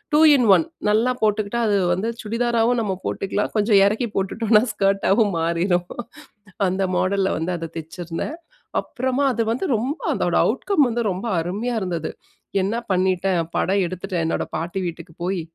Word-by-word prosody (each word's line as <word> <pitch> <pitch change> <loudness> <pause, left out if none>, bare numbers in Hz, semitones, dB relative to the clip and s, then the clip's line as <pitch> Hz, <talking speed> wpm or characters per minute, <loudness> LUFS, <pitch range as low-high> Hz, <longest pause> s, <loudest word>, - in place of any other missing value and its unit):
2 - - +6 0.2
இன் 250 - +3
1. 325 - +2 0.2
நல்லா 225 +4 +3
போட்டுக்கிட்டா, 215 +2 +1
அது 205 -1 +3 0.2
வந்து 195 +6 -1
சுடிதாராவும் 235 +1 +1
நம்ம 200 -4 -1
போட்டுக்கலாம், 200 +1 -2
கொஞ்சம் 205 -1 +4
எறக்கி 220 +4 0
போட்டுட்டோம்னா 215 +3 +2
ஸ்கர்ட்டாவும் 195 0 +2
மாறிரும். 175 +2 0 0.8
அந்த 190 +1 -1
மாடல்ல 190 +1 +1
வந்து 170 +3 -2
அத 165 -1 -6
தெச்சிருந்தேன். 170 - -6 0.4
அப்புறமா, 260 +2 -2
அது 235 - -1
வந்து 255 - -2
ரொம்ப 265 +9 -3 0.2
அதோட - - 0
அவுட்கம் 320 -9 +2
வந்து 235 0 -1
ரொம்ப 185 +5 -5 0.2
அருமையா 210 +8 -3
இருந்தது. 170 -4 -3 0.5
என்ன 200 +4 -1 0.2
பண்ணிட்டேன், 185 0 +1 0.2
படம் 195 +1 +2
எடுத்துட்டேன். 185 0 -3
என்னோட 165 - 0
பாட்டி 175 +4 -3
வீட்டுக்கு 170 0 -7
போயி, 185 -1 -1
195 Hz, 145 wpm, -22 LUFS, 180-230 Hz, 0.8 s, 2